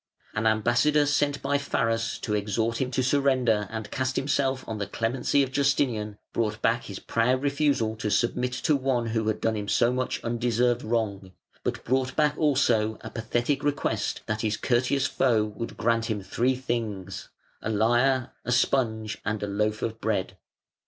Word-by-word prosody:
An 110 +1 0
ambassador 120 +7 +3
sent 145 0 +1
by 140 +1 +1
Pharas 115 -4 0
to 105 - -2
exhort 110 +3 0
him 130 - 0
to 130 0 0
surrender 125 -6 +2
and 110 -2 -6
cast 130 0 -1
himself 135 -1 0
on 110 -2 -4
the 100 - -2
clemency 120 +6 +1
of 130 - -4
Justinian 130 -7 +1 0.2
brought 105 -2 -1
back 115 +2 +1
his 100 - -6
proud 125 +6 0
refusal 140 -6 +1
to 110 - -2
submit 125 +3 +1
to 150 +4 +1
one 130 -3 0
who 110 -1 -1
had 110 - 0
done 115 -1 0
him 105 -1 -4
so 120 +4 +3
much 130 0 -1
undeserved 120 +1 +1
wrong, 100 -5 -2 0.3
but - - -2
brought 130 +1 0
back 150 -1 +2
also 120 -8 +2
a - - -8
pathetic 120 +5 -1
request 140 -7 -1
that 110 -1 -2
his 110 -1 0
courteous 130 +3 +1
foe 120 -6 +2
would 110 +2 -6
grant 115 0 +1
him 105 -3 -2
three 125 +6 +1
things, 110 -7 -4 0.3
a - - -3
lyre, 120 +4 +2
a 125 - -3
sponge, 110 -4 +1
and 110 -1 -2
a - - -1
loaf 105 +2 -1
of 115 0 -3
bread. 100 -3 -1
115 Hz, 170 wpm, -26 LUFS, 110-130 Hz, 0.3 s, ambassador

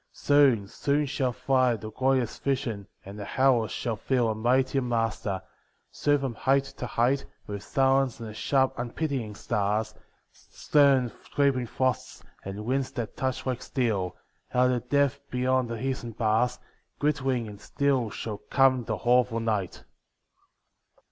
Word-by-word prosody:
Soon, 135 -8 +3
soon 145 +7 0
shall 135 -2 -1
fly 130 -1 +2
The 110 0 -8
glorious 130 0 0
vision, 125 -7 -2 0.2
and 100 +2 -9
the 100 - -6
hours 125 -5 +4
shall 115 -2 -2
feel 120 +1 +1
A - - +1
mightier 130 +4 +1
master; 115 -5 -1 0.5
soon 145 0 +2
from 135 -3 -3
height 135 +4 +2
to 125 - -4
height, 130 +5 +1 0.2
With 100 -1 -5
silence 135 0 +2
and 115 - -6
the 110 - -8
sharp 130 +4 +1
unpitying 120 -3 -3
stars, 105 +2 -1 0.4
Stern 135 -5 +2 0.2
creeping 135 -4 +2
frosts, 130 +2 -2 0.2
and 100 +2 -6
winds 130 +2 0
that 115 -3 -4
touch 130 -1 -2
like 125 -1 -2
steel, 110 -10 -1 0.4
Out 125 0 +4
of 125 -1 0
the 120 - -28
depth 140 -1 +2
beyond 125 0 +1
the 115 -1 -4
eastern 130 -3 -3
bars, 115 +3 +1 0.4
Glittering 135 -5 0
and 105 -1 -10
still 135 -5 0
shall 105 0 -5
come 130 -3 +4
the - - -1
awful 120 -1 +2
night. 105 -5 -2
125 Hz, 150 wpm, -27 LUFS, 110-135 Hz, 0.5 s, hours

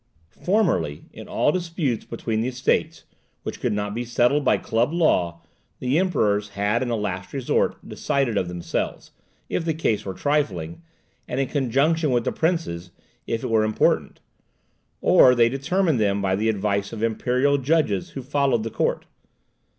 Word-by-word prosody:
Formerly, 170 - +1
in - - -10
all - - +2
disputes 165 - -2
between 115 -1 -3
the 120 - -1
Estates, 130 +1 0 0.4
which - - -5
could - - -1
not 105 0 -2
be 120 +2 -3
settled 120 +4 +2
by - - +3
club 115 +5 0
law, 90 - +1 0.3
the 130 +5 +1
Emperors 105 - +1
had 100 +3 0
in 130 - -1
the 120 -1 -1
last 95 -3 -4
resort 135 -3 0
decided 135 -5 -1
of 95 - 0
themselves, 90 -1 -4 0.4
if - - -2
the 160 -2 -1
case 110 -9 0
were 95 -3 -5
trifling, 105 - -1 0.5
and 125 - -3
in 135 - +1
conjunction 145 +4 +1
with 120 -2 +1
the - - -1
princes, 160 - -1 0.4
if 115 -1 -2
it - - -3
were 110 -1 +4
important; 110 0 +1 0.8
or 125 - +6
they 115 -1 +4
determined 150 +3 0
them 100 -1 +1
by 95 -1 +1
the 110 +3 0
advice 100 -1 -1
of 110 -1 -5
imperial 125 +5 +1
judges 135 - +1
who 135 - -5
followed 135 -4 +1
the 115 - -4
court. - - -1
120 Hz, 165 wpm, -23 LUFS, 105-145 Hz, 0.8 s, or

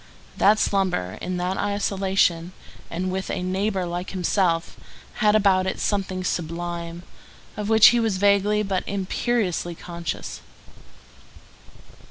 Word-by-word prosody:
That 210 +2 +4
slumber 185 - 0
in 180 0 -3
that 180 +2 -2
isolation, 195 -4 0 0.4
and 185 +2 -3
with 190 +1 -3
a 180 - -2
neighbor 190 +1 -1
like 175 +1 -4
himself, 180 -2 0 0.4
had 210 -2 +3
about 190 -3 +3
it - - -3
something 190 -2 -1
sublime, 170 0 -4 0.5
of 210 0 -4
which 220 -1 +8
he 240 - +2
was 220 -4 0
vaguely 205 +1 +3
but 195 -2 -1
imperiously 195 -2 -1
conscious. 170 0 -6
190 Hz, 120 wpm, -24 LUFS, 175-200 Hz, 0.5 s, which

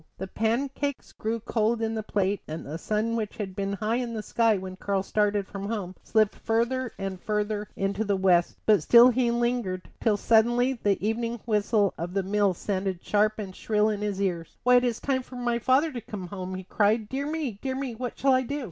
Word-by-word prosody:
The 190 - -4
pancakes 260 +7 -2
grew 225 +1 -3
cold 225 0 0
in 225 0 -1
the 220 - -2
plate, 200 -1 -1
and 155 +1 -6
the 155 +4 -6
sun 215 +4 -1
which 215 -2 -3
had 195 -3 -5
been 200 0 -2
high 215 +3 -1
in 240 -2 -3
the 215 - -4
sky 225 -2 +2
when 185 0 -7
Karl 195 0 -1
started 205 0 +1
from 200 -1 -6
home 200 -4 -4
slipped 215 -2 +2
farther 235 +2 -1
and 195 -1 -5
farther 210 -1 -1
into 195 +2 -1
the 200 -2 +1
west; 180 -2 +3
but 210 -5 +5
still 235 +9 +8
he 250 -1 +2
lingered, 235 -6 -1
till 215 -3 +2
suddenly 240 +4 +3
the 205 -5 0
evening 230 +1 -2
whistle 210 -2 +2
of 175 +3 -4
the 195 - +1
mill 200 -1 +1
sounded 190 -1 -3
sharp 215 +1 +2
and 195 -4 -6
shrill 215 0 +1
in 210 -1 -2
his 205 -2 -2
ears. 175 -4 -2
"Why, 250 +1 +6
it 245 - +3
is 240 -2 0
time 265 -2 0
for 255 - -12
my 240 -1 -1
father 265 +7 +3
to 245 -4 -5
come 205 -3 -7
home," 185 -1 -5
he 185 - -6
cried. 210 +3 +1
"Dear 275 +5 -3
me, 300 -9 -3
dear 265 -1 -2
me, 265 -2 -3
what 245 +2 -5
shall 270 -1 +3
I 255 - +4
do?" 280 +3 -3
215 Hz, 220 wpm, -27 LUFS, 195-240 Hz, -, still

